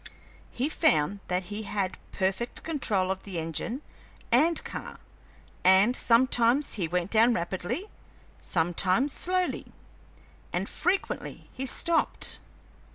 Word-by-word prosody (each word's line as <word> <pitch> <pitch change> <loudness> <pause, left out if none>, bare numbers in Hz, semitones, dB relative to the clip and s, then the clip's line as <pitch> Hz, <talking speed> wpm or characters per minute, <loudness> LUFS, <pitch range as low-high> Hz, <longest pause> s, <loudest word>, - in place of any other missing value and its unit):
He 255 +4 -2
found 165 - +2
that 180 +1 -1
he 210 - -3
had 200 -3 -3
perfect 195 +5 -2
control 210 - 0
of 190 0 -3
the 190 -4 -7
engine 165 - -3 0.5
and 310 +8 +3
car, - - -7 0.7
and 190 +6 +5
sometimes 245 +3 +3
he 185 -6 -1
went 180 +2 -2
down 230 +2 +5
rapidly, 185 - -3 0.5
sometimes 185 - +1
slowly, 365 0 0 0.8
and - - -1
frequently 385 +2 -2
he 265 +1 -4
stopped. 335 +5 +2
215 Hz, 110 wpm, -28 LUFS, 185-265 Hz, 0.8 s, and